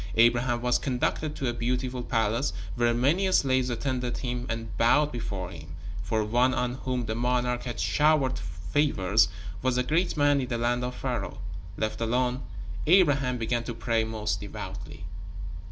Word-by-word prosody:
Abraham 120 +1 +3
was 125 0 +3
conducted 145 +4 -1
to 135 - -2
a 120 - 0
beautiful 125 +1 -1
palace, 115 +3 0 0.2
where 120 +3 +2
many 150 +11 +2
slaves 130 -6 +3
attended 125 0 -2
him 125 -1 -3
and 115 0 -4
bowed 145 +6 +4
before 100 -7 -4
him, 80 -2 -10 0.3
for 110 +4 0
one 120 +4 +2
on 125 -1 0
whom 125 -1 -2
the 110 - -2
monarch 125 +1 0
had 120 -4 -4
showered 135 - +3
favors 90 - +1 0.3
was 130 -1 +1
a 125 - +3
great 165 +6 +1
man 145 -1 +4
in 125 - -3
the 120 -1 -1
land 120 +1 +1
of 125 0 -3
Pharaoh. 120 -9 -3 0.4
Left 110 +1 -2
alone, 125 +2 +1 0.5
Abraham 145 -8 +4
began 115 +1 -1
to 120 - -4
pray 115 -1 +1
most 110 -1 -2
devoutly. - - -7
125 Hz, 160 wpm, -28 LUFS, 115-130 Hz, 0.5 s, bowed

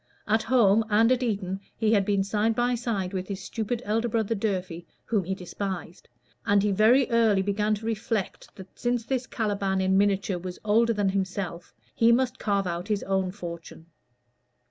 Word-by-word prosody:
At 220 +2 +2
home 225 -4 +4
and 225 +3 +4
at 255 0 +2
Eton 195 -5 -2 0.2
he 220 -1 +2
had 200 -3 +3
been 200 -1 +1
side 210 +3 0
by 245 +1 +1
side 220 -6 -2
with 185 -1 -3
his 195 -2 -5
stupid 225 +4 -4
elder 225 +3 0
brother 225 -1 0
Durfey, 185 -5 -3 0.2
whom 215 -5 0
he 190 +2 -2
despised; 185 -1 -6 0.3
and 200 -1 +3
he 210 - +2
very 230 +7 +4
early 220 -4 +3
began 210 +2 0
to 215 +2 -9
reflect 225 -2 -3
that 190 -1 -13
since 240 -2 -1
this 260 0 -2
Caliban 200 -4 -1
in 190 +1 +3
miniature 200 -2 +1
was 180 0 -7
older 230 +2 +3
than 205 -2 +1
himself, 190 -3 -3 0.2
he 230 0 +4
must 250 +1 +1
carve 200 -2 0
out 175 +1 -3
his 210 -2 -1
own 190 -1 0
fortune. 170 -3 -8
205 Hz, 180 wpm, -26 LUFS, 190-225 Hz, 0.3 s, home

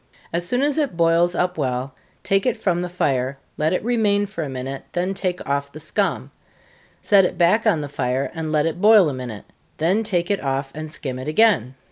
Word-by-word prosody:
As 175 +1 -1
soon 250 +5 +1
as 290 +1 +1
it 275 - -1
boils 170 +1 +3
up 180 -2 -1
well, 130 -1 -2 0.3
take 195 +4 +2
it 245 -1 +1
from 180 -5 0
the 180 - -3
fire, 135 -6 -1 0.2
let 155 +1 0
it 180 - -1
remain 210 -4 +2
for 180 -5 -5
a 145 - -5
minute, 135 +1 -5
then 180 +2 -1
take 185 -2 -3
off 140 0 -1
the 155 - -10
scum 155 - -1 0.7
set 200 -2 +5
it 180 - -1
back 190 +7 +3
on 165 -8 +3
the 145 - -4
fire, 135 -1 -2
and 160 -2 -4
let 150 -1 +2
it 165 +2 -2
boil 210 -6 +6
a - - -4
minute, 125 -5 -7 0.3
then 180 +7 +2
take 185 -4 -1
it 200 - -1
off, 135 0 -2
and 155 +1 -6
skim 130 -4 -5
it 130 - -7
again. 155 - +3
165 Hz, 215 wpm, -22 LUFS, 140-195 Hz, 0.7 s, boil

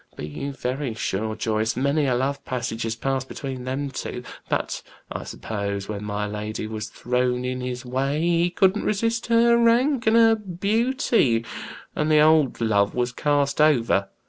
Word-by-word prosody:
Be - - -6
you 105 - -5
very 130 -2 -3
sure, 110 0 -2
Joyce, 110 0 0
many 140 +2 +1
a 125 - +2
love 140 +3 -1
passage 120 -2 -3
had 115 0 -3
passed 135 -1 -1
between 130 -3 -6
them 135 +2 -3
two; 125 - -5 0.3
but - - -1 0.3
I - - -4
suppose 100 -2 -4
when 105 -1 -5
my 105 0 -2
lady 105 +1 -4
was 110 -1 -5
thrown 125 0 -1
in 130 0 -2
his 125 0 -4
way 135 +4 -1
he 170 +1 +2
couldn't 190 +3 +2
resist 230 +3 0
her 235 0 +5
rank 235 +2 +3
and 220 - +5
her 225 -1 +6
beauty, 210 - +1 0.5
and 150 +1 0
the 155 - +6
old 155 -3 +4
love 105 -3 +2
was 125 0 0
cast 145 +2 +1
over. 115 -10 +3
130 Hz, 170 wpm, -24 LUFS, 115-170 Hz, 0.5 s, her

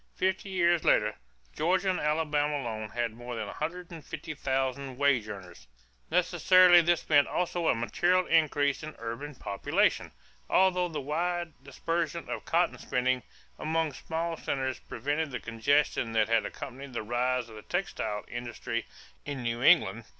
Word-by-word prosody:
Fifty 190 +1 -1
years 175 -3 +2
later, 105 0 +3 0.4
Georgia 185 +4 +2
and 180 - -2
Alabama 150 -1 +1
alone 110 -5 -4
had 120 -2 -2
more 120 +1 -7
than 110 -2 -3
one 100 - -8
hundred 175 +3 -4
and 165 -3 -9
fifty 155 - -6
thousand 135 -1 -2
wage 130 -6 +2
earners. 95 -8 -10 0.4
Necessarily 185 -2 +6
this 170 0 +1
meant 145 -2 +5
also 175 -1 -1
a - - +4
material 175 +10 +1
increase 145 -3 +2
in 155 0 -7
urban 115 +6 -6
population, 100 -5 0 0.4
although 180 -1 +3
the 160 -3 -4
wide 170 +4 -2
dispersion 165 +3 -3
of - - -4
cotton 170 +1 +1
spinning 125 0 0 0.4
among 160 -1 0
small 165 +4 -3
centers 130 -3 -2
prevented 145 +6 -2
the 125 - -4
congestion 115 0 +1
that 110 -1 +2
had 115 -1 +2
accompanied 135 +1 -8
the 115 - -3
rise 125 +2 0
of 115 - -13
the 105 - -9
textile 110 - -3
industry 120 -1 -4 0.4
in 140 -3 -5
New 115 0 -2
England. 110 -4 +4
140 Hz, 155 wpm, -29 LUFS, 120-165 Hz, 0.4 s, Necessarily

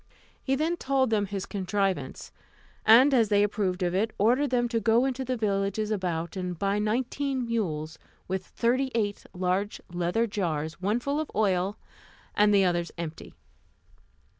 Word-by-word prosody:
He 270 - 0
then 320 +5 0
told 265 -4 +1
them 205 -2 +1
his 195 -1 -4
contrivance; 190 -7 -2 0.6
and 255 +6 +7
as 230 -5 +4
they 205 -1 +4
approved 195 -3 -1
of 175 0 0
it, 205 +4 +1
ordered 250 +8 +3
them 240 -1 +1
to 230 -1 0
go 225 +4 +3
into 265 0 -2
the 255 0 -2
villages 205 0 -1
about, 175 -4 -2
and 180 -2 -4
buy 200 +3 0
nineteen 255 +4 -1
mules, 160 -9 -2 0.3
with 190 0 -2
thirty 250 +6 0
eight 205 -3 -1
large 185 +3 -1
leather 175 +6 +1
jars, 165 -6 -3
one 210 +5 +1
full 280 +4 -1
of 310 - -3
oil, 195 -1 +1 0.6
and 210 0 +4
the 200 -2 +5
others 175 -1 0
empty. 165 -2 -7
205 Hz, 160 wpm, -27 LUFS, 185-235 Hz, 0.6 s, and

